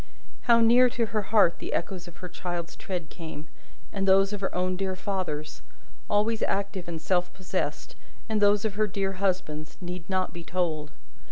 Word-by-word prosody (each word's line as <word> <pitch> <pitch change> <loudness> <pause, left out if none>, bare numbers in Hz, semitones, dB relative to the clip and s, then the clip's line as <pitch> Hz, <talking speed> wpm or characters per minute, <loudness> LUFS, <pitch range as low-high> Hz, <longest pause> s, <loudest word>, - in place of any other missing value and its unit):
How 235 0 +7
near 245 +2 +7
to 235 -1 0
her 215 -1 -1
heart 205 -4 +4
the - - -4
echoes 175 0 -2
of 175 - -12
her - - -3
child's 175 -1 -4
tread 180 -5 -5
came, 160 -2 -7 0.5
and 195 -1 -1
those 195 +1 +5
of 205 - -4
her 195 - -2
own 185 0 +1
dear 190 0 -1
father's, 180 -6 -3 0.5
always 215 +2 +2
active 195 -2 -1
and 165 -2 -4
self 180 +1 +1
possessed, 185 -1 -3 0.3
and 220 -2 0
those 205 +1 +4
of 215 - 0
her 215 +1 +2
dear 195 0 -1
husband's, 180 -6 -1
need 180 -1 -6
not 185 -1 0
be 170 -1 -7
told. 165 -4 -1
190 Hz, 180 wpm, -28 LUFS, 175-205 Hz, 0.5 s, How